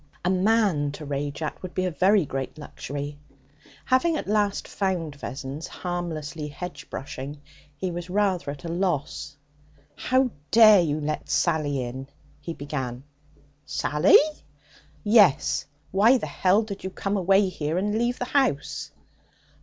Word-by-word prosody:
A 180 - +3
man 190 -6 +2
to 150 - -8
rage 145 +2 -3
at 155 - -4
would 185 -1 -8
be 185 - 0
a 180 - 0
very 190 +3 +3
great 135 +2 -4
luxury. 145 -1 -6 0.7
Having 315 +6 +3
at - - -5
last 205 -1 +1
found 180 -6 -2
Vessons, 140 +2 -6
harmlessly 160 -4 -4
hedge 180 +5 -8
brushing, 140 +2 -6 0.4
he 185 +4 -2
was 175 +1 -6
rather 190 -5 +1
at 140 +2 -7
a - - -3
loss. 165 -5 -2 0.6
'How 255 -1 +1 0.2
dare 215 -4 +8
you 155 -2 0
let 150 0 -3
Sally 150 -5 +1
in?' 130 +2 -6 0.3
he 165 - -6
began. 130 -4 -4 0.6
'Sally?' 145 +4 +4 0.9
'Yes. 205 - +4 0.2
Why 220 +7 +5
the - - -4
h 195 +4 +2
did 200 -2 -7
you 190 - -3
come 195 +2 -3
away 195 +1 +4
here 160 -2 -2
and 205 +3 0
leave 240 +2 0
the 250 - -2
house?' 255 - 0
170 Hz, 145 wpm, -25 LUFS, 145-200 Hz, 0.9 s, dare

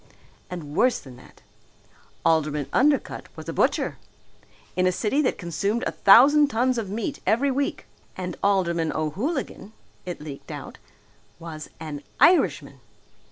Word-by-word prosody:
And 155 -5 -7
worse 250 +4 +3
than 130 -3 -13
that! 130 - -18 0.8
Alderman 150 -3 +2
Undercutt 285 +1 +1
was - - -10
a - - -3
butcher! - - 0 0.8
In 185 0 +2
a - - +3
city 225 +10 0
that 260 - 0
consumed 200 +7 -2
a - - -1
thousand 285 +9 +6
tons 250 -1 +1
of 210 -4 -5
meat 230 +7 -3
every 270 +5 +3
week! 275 +2 -2 0.3
And 180 -2 -4
Alderman 170 -5 +1
O'Hooligan 210 - -3 0.3
it 180 -1 -6
leaked 150 -2 -9
out - - -8 0.6
was 160 -2 -8
an 155 -3 -6 0.2
Irishman! 360 0 +3
190 Hz, 135 wpm, -24 LUFS, 160-255 Hz, 0.8 s, thousand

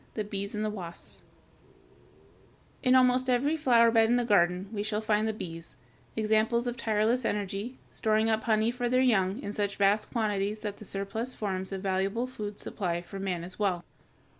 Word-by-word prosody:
THE 215 - -1
BEES 200 0 -5
AND 210 0 -1
WASPS 175 -4 -8 1.6
In 255 -1 +4
almost 255 0 +4
every 270 +5 +2
flower 235 -6 +4
bed 225 -1 +4
in 240 - +4
the 245 -1 +1
garden 180 -3 +3
we 205 - -2
shall 210 0 -1
find 215 0 +1
the - - +1
bees, 165 -8 -8 0.4
examples 220 +2 +2
of 240 -1 -2
tireless 225 +2 +1
energy, 205 +4 -3
storing 220 0 +1
up 220 -1 0
honey 220 0 +2
for 245 0 -2
their 255 +1 +3
young 200 -4 +2
in 205 - -4
such 205 -1 -1
vast 200 +2 +2
quantities 210 -2 -1
that 205 -1 -4
the 215 - -11
surplus 200 +6 -4
forms 190 -2 -3
a 195 - -2
valuable 195 +4 -1
food 210 -5 -6
supply 175 -4 -2
for 195 +3 -8
man 185 -3 -2
as 185 +3 -5
well. 185 -4 0
215 Hz, 180 wpm, -29 LUFS, 195-235 Hz, 1.6 s, In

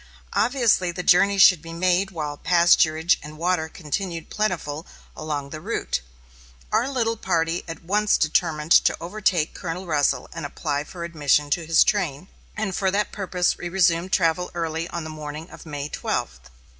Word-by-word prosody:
Obviously 230 -7 +2
the 180 +1 -5
journey 195 +3 +4
should 185 -4 +7
be 165 0 -9
made 185 +2 +1
while 155 -5 -4
pasturage 170 0 +3
and 150 +1 -10
water 170 -1 0
continued 170 +1 -5
plentiful 165 -7 -2 0.3
along 145 -3 -4
the 155 - -7
route. 200 - -2 0.7
Our 265 - +2
little 230 -4 0
party 165 -2 0
at 165 0 -8
once 210 +4 +2
determined 155 0 0
to - - +5
overtake 175 -2 0
Colonel 180 +1 -5
Russell 150 -4 +1
and 165 - -6
apply 145 0 -3
for 175 0 -8
admission 150 -3 +1
to 165 +1 0
his 165 -1 +6
train, 180 -5 -1 0.3
and 210 -3 -2
for 190 - +1
that 205 +2 0
purpose 185 -3 -1
we 175 - -4
resumed 175 0 +2
travel 180 -1 +1
early 165 -1 -2
on 170 -2 -5
the 155 - -7
morning 155 +1 -8
of - - -12
May 145 -1 -4
twelfth. 65 - -4
170 Hz, 165 wpm, -23 LUFS, 155-185 Hz, 0.7 s, should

